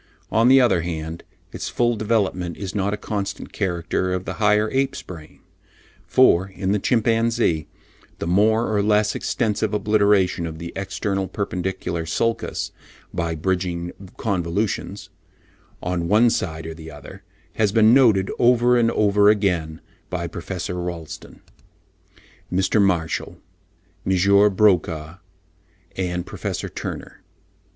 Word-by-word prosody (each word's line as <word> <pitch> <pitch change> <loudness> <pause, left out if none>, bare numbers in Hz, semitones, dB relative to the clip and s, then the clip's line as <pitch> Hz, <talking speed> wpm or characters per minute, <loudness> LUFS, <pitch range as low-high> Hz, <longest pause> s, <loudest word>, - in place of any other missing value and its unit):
On 115 +2 +4
the 135 +1 +7
other 110 -9 +3
hand, 80 0 -5 0.3
its - - -5
full 120 -1 +1
development 100 -5 -1
is 95 -2 -5
not 100 -1 0
a 105 - -2
constant 100 -2 -5
character 90 -1 -1
of 90 0 -3
the - - -4
higher 105 +1 +4
ape's 135 +1 -1
brain. 80 -4 -11 0.7
For, 90 +3 +4
in 95 0 -3
the 105 - +2
chimpanzee, 115 -8 +1 0.5
the - - -4
more 110 +5 +2
or 100 - +3
less 105 0 +2
extensive 110 -3 -1
obliteration 100 -4 +2
of 80 -1 -7
the 85 +1 -7
external 95 0 -2
perpendicular 95 -3 -3
sulcus 115 +7 -1 0.4
by 85 -2 -2
"bridging 90 0 -2 0.3
convolutions," 95 0 -2 0.7
on 90 -1 -1
one 110 +5 +4
side 80 -6 -3
or 80 - -5
the 80 0 -10
other, 75 -2 -11 0.4
has 105 -3 +2
been 110 +1 +5
noted 110 -8 +4
over 120 0 +4
and 115 -1 +3
over 105 -2 +4
again 90 -7 0 0.3
by 90 -1 -3
Prof. 85 +1 -5
Rolleston, 85 -3 -6 1.1
Mr. 95 +3 +2
Marshall, 90 -5 0 0.7
M. 100 +2 +4
Broca 85 -4 +1 0.8
and 90 -2 -2
Professor - - -4
Turner. - - -7
95 Hz, 125 wpm, -22 LUFS, 85-105 Hz, 1.1 s, the